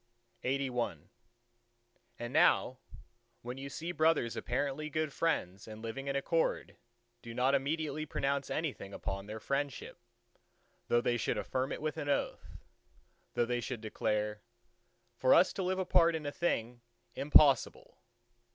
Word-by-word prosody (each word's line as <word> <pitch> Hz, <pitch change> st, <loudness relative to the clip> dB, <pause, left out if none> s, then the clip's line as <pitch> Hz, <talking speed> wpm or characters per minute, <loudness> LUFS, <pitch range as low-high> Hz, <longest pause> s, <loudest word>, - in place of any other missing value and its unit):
LXXXII 125 Hz, -, -2 dB, 1.1 s
And 120 Hz, +1 st, -6 dB
now, 130 Hz, 0 st, +4 dB, 0.6 s
when 125 Hz, +2 st, -6 dB
you 140 Hz, +1 st, -6 dB
see 165 Hz, +5 st, -4 dB
brothers 155 Hz, -8 st, +2 dB
apparently 140 Hz, +4 st, -2 dB
good 155 Hz, -1 st, -1 dB
friends 100 Hz, -, -1 dB
and 110 Hz, 0 st, -8 dB
living 135 Hz, +5 st, -5 dB
in 140 Hz, -, -1 dB
accord, 165 Hz, +4 st, 0 dB, 0.5 s
do 115 Hz, -1 st, -9 dB
not 130 Hz, +2 st, +2 dB
immediately 155 Hz, +2 st, -1 dB
pronounce 140 Hz, -1 st, -1 dB
anything 140 Hz, -11 st, -3 dB
upon 95 Hz, +1 st, -4 dB
their 110 Hz, +1 st, -6 dB
friendship, 140 Hz, +2 st, -3 dB, 0.9 s
though 120 Hz, -, +3 dB
they 120 Hz, -1 st, +1 dB
should -, -, -1 dB
affirm 130 Hz, +1 st, -2 dB
it -, -, -4 dB
with 155 Hz, -2 st, -2 dB
an 145 Hz, -, -3 dB
oath, 140 Hz, -, -2 dB, 0.8 s
though 120 Hz, -, +3 dB
they 120 Hz, 0 st, -1 dB
should 120 Hz, -2 st, -5 dB
declare, 105 Hz, -1 st, -1 dB, 0.8 s
"For 130 Hz, +2 st, +5 dB
us 185 Hz, -, +5 dB
to -, -, -3 dB
live 185 Hz, 0 st, 0 dB
apart 175 Hz, -3 st, +4 dB
in 155 Hz, -2 st, -4 dB
a 145 Hz, -, -2 dB
thing 120 Hz, -7 st, -1 dB, 0.3 s
impossible!" 140 Hz, -1 st, +4 dB
135 Hz, 140 wpm, -33 LUFS, 120-155 Hz, 1.1 s, For